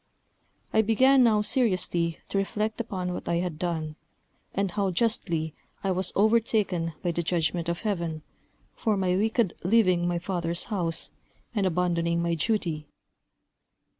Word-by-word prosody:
I 220 - +5
began 255 +5 +5
now 215 -3 +4
seriously 185 -8 +2
to 200 - 0
reflect 215 +3 -1
upon 185 -5 -3
what - - -5
I 170 - +2
had 170 -3 -2
done, 160 -3 -3 0.5
and 195 -1 -1
how 200 0 0
justly 170 -6 0 0.3
I 195 - +1
was 185 0 -1
overtaken 210 -6 +2
by 175 - +1
the 170 - -1
judgment 170 0 0
of 170 - -2
Heaven, 170 -7 -2 0.5
for 215 -3 0
my 185 -1 +1
wicked 220 0 +1
leaving 185 -3 +3
my 175 0 0
father's 170 -1 -2
house, 170 -5 -1 0.4
and 205 -4 +1
abandoning 170 -1 +1
my 170 0 0
duty. 165 -4 -1
180 Hz, 140 wpm, -27 LUFS, 170-210 Hz, 0.5 s, I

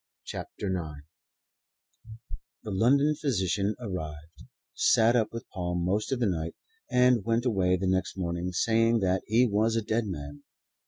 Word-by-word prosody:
CHAPTER - - -6
IX 75 -5 -6 1.6
THE 105 - -5
London 140 +9 +3
physician 105 - 0
arrived, 80 -7 -7 0.3
sat 445 - +4
up 110 -3 +1
with 115 0 -7
Paul 90 -2 -2
most 95 +7 -1
of 130 - 0
the 120 - +2
night, 85 -4 -2 0.3
and 125 -3 +4
went 115 +3 0
away 95 -6 +2
the 95 - -3
next 95 +1 0
morning 85 0 -2
saying 115 +4 +2
that 95 0 +1
he 115 +4 +4
was 110 +1 +1
a 115 - 0
dead 110 +1 -1
man. 75 -5 -7
100 Hz, 150 wpm, -28 LUFS, 90-115 Hz, 1.6 s, sat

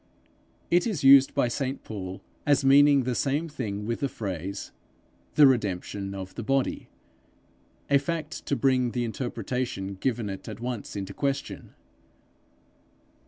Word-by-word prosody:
It 175 +5 +4
is 195 -12 -2
used 135 0 +7
by 140 -3 +3
St 135 +2 -3
Paul 95 -3 -7 0.2
as 145 -1 +2
meaning 140 0 +6
the 125 0 -1
same 145 +6 0
thing 105 -9 -4
with 115 +1 -2
the 140 - -1
phrase, 100 - -5 0.6
'the 150 - +8
redemption 100 -5 0
of 95 -1 -7
the - - -5
body' 135 +3 -1 1.0
a 140 -1 +4
fact 160 +2 -4
to 140 - +1
bring 125 -1 +2
the 120 - -1
interpretation 115 -3 -3
given 115 +2 -2
it 95 +2 -6
at 105 - -7
once 120 -4 -5
into 100 -1 -5
question. 140 -1 -3
125 Hz, 140 wpm, -27 LUFS, 105-140 Hz, 1.0 s, the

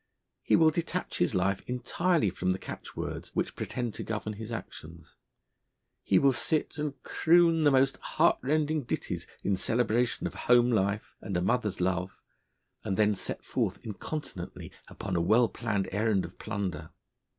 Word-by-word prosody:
He - - +3
will 160 -1 +6
detach 170 +3 -3
his 90 - +2
life 95 +2 +1
entirely 125 - +1
from 90 0 -2
the 95 - +2
catchwords - - -6
which - - -1
pretend 120 -3 -3
to - - -5
govern 110 -1 -3
his 110 +2 -7
actions; 85 -7 -8 0.9
he 95 - +3
will 135 +4 +5
sit 155 +5 -1
and 150 -2 -3
croon 165 -1 +4
the - - +7
most 135 0 +3
heartrending 155 +3 +1
ditties - - -3 0.2
in 100 - +2
celebration 115 +3 +1
of - - -3
home 120 0 +4
life 100 -1 0
and 95 -4 -2
a - - 0
mother's 105 -1 0
love, 90 0 -1 0.6
and 95 - -2
then 105 -1 +4
set 100 - -5
forth - - -1
incontinently 105 - -6 0.2
upon 95 -2 -5
a 85 - +2
well 110 +7 +4
planned 105 -5 -2
errand 105 -1 +1
of - - -12
plunder. 90 -6 -4
110 Hz, 155 wpm, -29 LUFS, 95-135 Hz, 0.9 s, the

